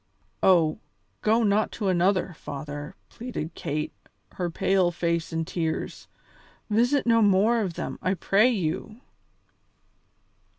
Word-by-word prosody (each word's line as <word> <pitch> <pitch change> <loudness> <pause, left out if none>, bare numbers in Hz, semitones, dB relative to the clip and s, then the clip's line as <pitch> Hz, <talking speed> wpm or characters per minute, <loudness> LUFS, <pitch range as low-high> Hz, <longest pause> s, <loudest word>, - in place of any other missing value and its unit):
"Oh! 170 -2 +4 0.4
go 225 +2 +3
not 210 0 +2
to 210 - -3
another, 185 0 +2
father," 145 +3 -7
pleaded 225 -9 -6
Kate, 150 -3 -3 0.4
her 180 -2 -3
pale 185 +1 +2
face 170 -1 -1
in 165 0 -1
tears; 160 -1 -3 0.6
"visit 245 +6 +3
no 230 -1 +4
more 210 +3 +4
of 185 -5 -3
them, - - -5
I 185 +1 0
pray 200 +6 +3
you!" 200 +1 -2
185 Hz, 120 wpm, -26 LUFS, 165-215 Hz, 0.6 s, Oh